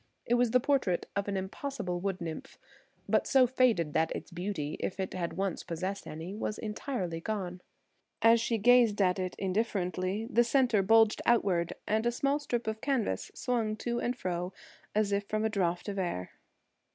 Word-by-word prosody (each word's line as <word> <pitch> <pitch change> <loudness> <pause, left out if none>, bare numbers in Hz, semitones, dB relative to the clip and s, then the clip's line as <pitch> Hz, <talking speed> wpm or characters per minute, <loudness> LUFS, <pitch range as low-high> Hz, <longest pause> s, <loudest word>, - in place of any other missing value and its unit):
It 240 - +1
was 245 0 +3
the 250 +2 +4
portrait 250 -9 +1
of 200 0 -1
an 200 -1 -1
impossible 190 -1 -4
wood 195 0 -2
nymph, 165 -2 -6 0.5
but - - +2
so 265 -2 +6
faded 235 - +2
that 160 0 +2
its - - -7
beauty–if 175 -1 -3
it 190 - -2
had 175 -2 -3
once 195 -2 -1
possessed 185 +4 -4
any–was 185 +7 -4
entirely 210 -6 -3
gone. 185 -3 -3 0.6
As 230 0 +5
she 230 0 0
gazed 235 -1 +5
at 185 -1 +3
it 185 -1 -3
indifferently 190 0 -1
the 240 -1 +4
centre 240 -3 +3
bulged 225 +2 +4
outward, 180 -7 +2
and 220 +2 +1
a - - +3
small 275 +4 +1
strip 240 -5 -2
of 220 0 -3
canvas 245 - -1
swung 230 -4 -1
to 240 +2 -2
and 245 +1 -1
fro 180 -2 -3 0.4
as 210 -1 +2
if 200 0 0
from 215 0 0
a - - +2
draught 180 -4 -1
of 200 -1 -3
air. 170 - -3
205 Hz, 175 wpm, -30 LUFS, 180-235 Hz, 0.6 s, so